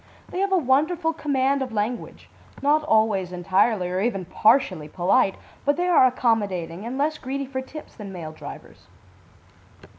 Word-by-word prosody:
They 365 - -4
have 395 0 0
a 380 - +4
wonderful 320 +4 +1
command 275 -2 0
of 260 -2 -3
language, 225 +3 -4 0.4
not 300 +2 +3
always 215 - +2
entirely 185 +2 +1
or 180 +1 -2
even 195 -5 -1
partially 190 - +2
polite, 190 +6 +2 0.3
but 285 +1 +1
they 355 - 0
are 330 -7 +6
accommodating 205 -7 -1
and 255 +2 -4
less 300 +2 0
greedy 275 +2 -4
for 260 0 -4
tips 300 +4 -10
than 205 -3 -9
male 165 -4 -7
drivers. 155 - -11
245 Hz, 155 wpm, -24 LUFS, 190-280 Hz, 0.4 s, are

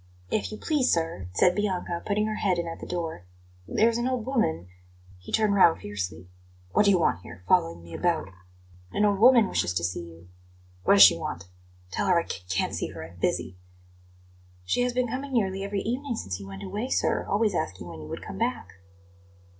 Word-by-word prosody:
"If 215 - -1
you 215 - -6
please, 290 -3 +1
sir," 165 - -1
said 180 - +4
Bianca, 180 -4 -2
putting 210 0 0
her 215 - -2
head 185 -3 +1
in 170 0 -2
at 165 - -6
the - - -8
door, 165 - -4 0.4
"there's 230 +1 +2
an 240 - 0
old 255 -4 -1
woman 90 - 0 0.3
" 90 +1 -24
He 90 - -11
turned 215 -2 +2
round 185 -4 +5
fiercely. 90 -4 -5 0.4
"What 210 - +3
do - - +5
you 195 - +5
want 125 - +1
here 90 - -12
following 85 0 +2
me 85 0 -12
about?" 170 - 0 0.6
"An 210 - +2
old 200 -2 +2
woman 235 -2 +7
wishes 90 - -1
to 85 - 0
see 90 +2 -1
you." 85 0 -13 0.6
"What - - +6
does 100 - +10
she 95 -4 +8
want? 85 +1 -5 0.4
Tell - - -1
her 180 -2 +4
I 165 - -3
c 90 - -6
can't 90 - 0
see - - -2
her; - - -8
I'm 85 +2 -14
busy." 90 +1 -1 1.1
"She 170 - +1
has 250 0 +1
been 250 0 0
coming 265 +3 -5
nearly 195 -4 0
every 200 0 -2
evening 250 +2 -2
since 95 - -4
you 100 - -9
went 95 0 -8
away, 210 +7 -4
sir, - - +1
always 210 0 +2
asking 95 - -3
when 80 -2 -9
you 75 - -9
would - - -6
come - - -7
back." 90 - -2
175 Hz, 210 wpm, -27 LUFS, -, 1.1 s, does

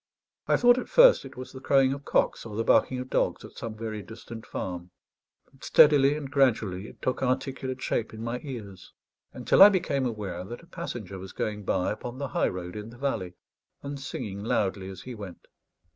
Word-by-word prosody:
I - - +4
thought, 245 +1 +5
at - - -7
first, - - +6
it - - -11
was 130 - -7
the 130 - -9
crowing 135 0 +3
of 140 0 -8
cocks - - +1
or 110 -2 -8
the 115 - 0
barking 130 - +3
of 125 0 -5
dogs - - 0
at - - -11
some 115 -2 -7
very 110 -1 -5
distant 115 +2 -10
farm; 90 -1 -5 0.6
but - - -20
steadily 145 -1 +6
and 145 -3 -7
gradually 110 -8 +1
it - - -15
took 130 - -1
articulate 130 0 -2
shape 110 - -1
in 110 0 -8
my 120 +1 -3
ears, 105 -10 -9 0.4
until - - +2
I 200 - +12
became 165 -9 0
aware 100 -6 -5
that 120 - -9
a - - -15
passenger 120 - -6
was 95 +1 -9
going 105 -2 -3
by 90 - 0
upon 120 +3 -6
the 140 0 -4
high - - +1
road 90 0 -6
in 105 +1 -6
the 120 - -13
valley, 115 -10 -2 0.5
and 140 0 -5
singing 100 -7 -5
loudly 95 -3 -1
as 95 - -9
he 125 - -7
went. 100 -5 -9
115 Hz, 205 wpm, -27 LUFS, 100-135 Hz, 0.6 s, I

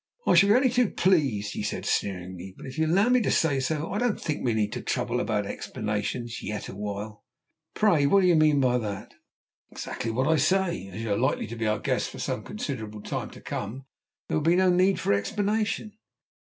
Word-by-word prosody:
"I - - +4
shall 200 - +6
be 210 - +6
only 260 +1 +4
too 245 -3 +2
pleased," 135 - +1
he - - -4
said - - -3
sneeringly, 95 -1 -3
"but - - -10
if 130 - -8
you'll 160 0 +2
allow 195 +7 +3
me 250 0 +4
to - - 0
say 145 -4 +2
so, 150 +4 -2
I 205 - -1
don't 240 -3 0
think 150 -2 -3
we 120 -3 +1
need 105 -1 0 0.2
trouble 125 -1 0
about 105 -4 0
explanations 105 +4 -4
yet 105 -1 -4
awhile." 105 +1 -6 0.5
"Pray, 170 -10 +3
what 200 +6 +5
do 185 - +3
you 175 - +5
mean 155 -2 +4
by 125 -2 +3
that?" 105 -4 -5 0.6
"Exactly 115 - -5
what 130 +4 0
I 160 0 +4
say; 175 - +1
as 95 +4 -7
you 110 - -2
are - - 0
likely 130 +4 +1
to 115 - -7
be 115 -1 -2
our 105 0 +1
guests - - -1
for - - -10
some - - -3
considerable 105 -1 -5
time - - -4
to - - -13
come, 120 +6 -5 0.4
there - - 0
will - - 0
be 165 +3 +4
no 185 0 +4
need 185 +2 +3
for - - +1
explanation." 210 - -1
130 Hz, 215 wpm, -27 LUFS, -, 0.6 s, shall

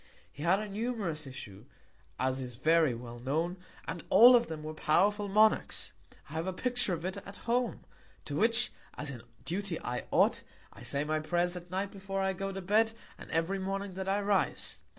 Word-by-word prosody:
He 145 - -11
had 175 +5 +3
a 215 - -4
numerous 200 - -2
Issue, 110 -4 -9 0.5
as 130 +1 0
is 125 -2 -6
very 155 0 +3
well 120 0 -8
known, 160 +8 -1 0.3
and 175 - -4
all 245 +2 +9
of 235 -1 +3
them 155 -1 -6
were 155 0 -5
powerful 200 +7 +2
Monarchs. 215 +2 +3 0.4
I 150 - -11
have 160 +3 -2
a 190 - -1
Picture 245 -2 0
of 165 +1 -7
it 185 +2 -3
at 200 0 -9
Home, 240 +1 0 0.4
to 145 - -4
which, 230 +7 +2 0.3
as 150 -2 -3
in 120 -3 -8 0.2
Duty 185 0 -3
I 125 0 -3
ought, - - +3 0.3
I - - -14
Say 140 +1 0
my 155 +1 0
Prayers 175 +3 0
at 175 0 -8
Night 195 +2 -2
before 195 0 -4
I 190 0 +1
go 195 +1 -3
to 195 0 -5
Bed, 220 +4 +3 0.3
and - - -10
every 165 +5 0
Morning 195 0 -3
that 190 +1 -3
I 200 +1 +2
rise. 200 -1 0
185 Hz, 195 wpm, -31 LUFS, 155-200 Hz, 0.5 s, all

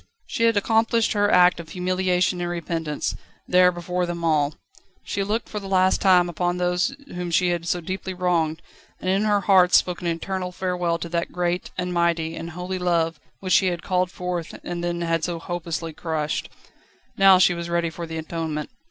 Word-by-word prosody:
She 230 - 0
had 230 -2 +3
accomplished 225 +2 +2
her 205 -1 +2
act 180 -1 +5
of 165 -2 -9
humiliation 180 0 0
and 175 - -2
repentance, 165 -3 -3 0.3
there 180 0 +5
before 180 +1 -2
them 170 -1 -4
all. 150 -2 +2 0.5
She 200 - -2
looked 215 +4 -2
for 210 - -5
the 195 - -8
last 185 -1 +3
time 180 -2 +5
upon 175 +1 -1
those 180 +7 0 0.2
whom 180 0 -4
she 175 +2 +2
had 170 -1 -2
so 175 - 0
deeply 190 +2 -4
wronged, 170 -3 0 0.4
and 185 - -1
in 195 +3 +1
her 205 -1 +2
heart 185 -3 +5
spoke 180 -1 +2
an 175 - -3
eternal 180 +2 -3
farewell 180 -2 -1
to 170 - -6
that 170 0 -2
great, 175 0 -1
and 180 -1 -2
mighty, 170 -1 +1
and 165 - -6
holy 180 +2 -5
love 170 -2 0 0.2
which 185 -1 0
she 190 - +5
had 175 -2 -2
called 180 -1 +1
forth 180 -2 -5
and 175 -1 -4
then 175 0 -2
had 165 -1 0
so 175 -2 -2
hopelessly 165 -1 -4
crushed. 155 -1 -3 0.7
Now 195 -1 +7
she 180 -1 +5
was 170 0 -5
ready 170 -1 0
for 170 +1 -6
the 160 0 -5
atonement. 160 -1 -4
175 Hz, 195 wpm, -23 LUFS, 170-185 Hz, 0.7 s, Now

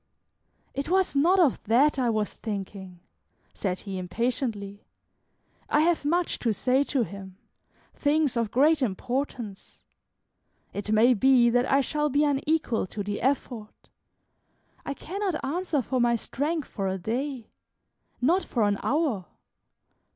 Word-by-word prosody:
"It 275 +3 -3
was 375 -3 +2
not 345 +7 +4
of 315 -8 +3
that 265 +6 +3
I 245 -2 +2
was 215 -2 -1
thinking," 195 -4 -6 0.5
said 185 -2 -3
he, 195 -2 -5
impatiently; 210 - -3 0.9
"I 295 - +3
have 335 -1 +2
much 345 +3 0
to 230 -3 +1
say 260 +5 +2
to 270 -4 +1
him, 195 -3 -9 0.6
things 290 -2 +1
of 230 -2 0
great 290 +6 +3
importance. 240 -1 -4 0.9
It 205 +1 -4
may 225 +4 +5
be 245 +1 +4
that 245 +1 +1
I 275 +1 +5
shall 300 +2 -1
be 285 +2 +2
unequal 285 -6 0
to 205 +2 -5
the 205 +1 -4
effort; 245 -4 -3 1.0
I 280 - -2
cannot 385 +2 -3
answer 310 -1 -1
for 255 +2 -1
my 240 0 +3
strength 295 +6 -2
for 195 -3 -3
a 190 0 -1
day, 245 +5 -4 0.7
not 340 +10 +2
for 235 - -1
an 205 -1 +1
hour. 270 - 0
250 Hz, 135 wpm, -27 LUFS, 210-290 Hz, 1.0 s, may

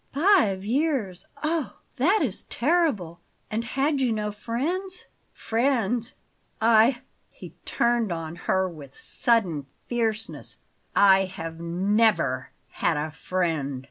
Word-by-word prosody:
"Five 280 - +3
years! 235 - -1 0.2
Oh, 310 -2 -1 0.2
that 365 - +3
is - - -1
terrible! 245 - 0 0.3
And 220 +2 -1
had 275 +4 0
you 250 -3 +2
no 210 -1 -1
friends?" 330 - -3 0.3
"Friends! 235 0 0 0.4
I" 230 +3 +4 0.3
he - - -12
turned 235 -4 +1
on 165 -1 -4
her 190 +1 0
with 150 -6 -11
sudden 180 - 0 0.2
fierceness 225 -2 -3 0.4
"I 195 -1 +6
have 165 -3 -7
NEVER 180 - +1 0.2
had - - 0
a 155 +1 -2
friend!" 160 -6 -2
220 Hz, 110 wpm, -25 LUFS, 180-260 Hz, 0.4 s, I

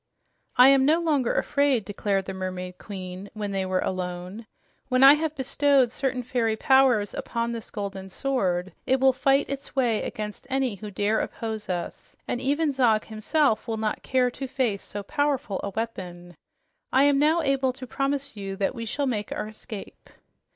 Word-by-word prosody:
"I 250 +2 +9
am 275 -1 +5
no 310 +5 +4
longer 295 -7 +1
afraid," 280 -7 +2
declared 200 -1 -1
the 190 - -5
Mermaid 185 -1 -5
Queen 190 -1 -7
when 205 -1 -3
they 190 -1 -1
were 185 0 0
alone. 185 +4 -4 0.4
"When 255 0 +4
I 275 +1 +11
have 310 0 -1
bestowed 270 -2 +2
certain 255 -1 -2
fairy 230 -3 0
powers 255 -4 +3
upon 235 0 -2
this 230 -2 -6
golden 195 -2 -5
sword, 190 -6 -1
it 260 +1 +3
will 265 0 +5
fight 270 +2 +2
its 275 -1 -6
way 240 -5 +2
against 210 -1 -6
any 265 -3 0
who 210 +1 -8
dare 205 +2 0
oppose 220 -2 -4
us, 175 -2 -5
and 245 - -2
even 290 +3 +1
Zog 235 -5 +2
himself 225 +4 +1
will 225 -1 -2
not 215 -1 -2
care 255 -1 +1
to 270 +2 -6
face 240 -6 -1
so 205 0 -6
powerful 275 -4 -1
a 200 - -2
weapon. 180 -5 -6 0.6
I 265 - +5
am 285 -1 +4
now 315 +3 +3
able 270 -2 +2
to 255 0 -8
promise 275 +1 -2
you 195 -1 -5
that 195 +3 -1
we 230 -2 -5
shall 285 +6 -2
make 215 -6 -2
our - - -3
escape." 215 -1 -10
230 Hz, 180 wpm, -26 LUFS, 200-270 Hz, 0.6 s, I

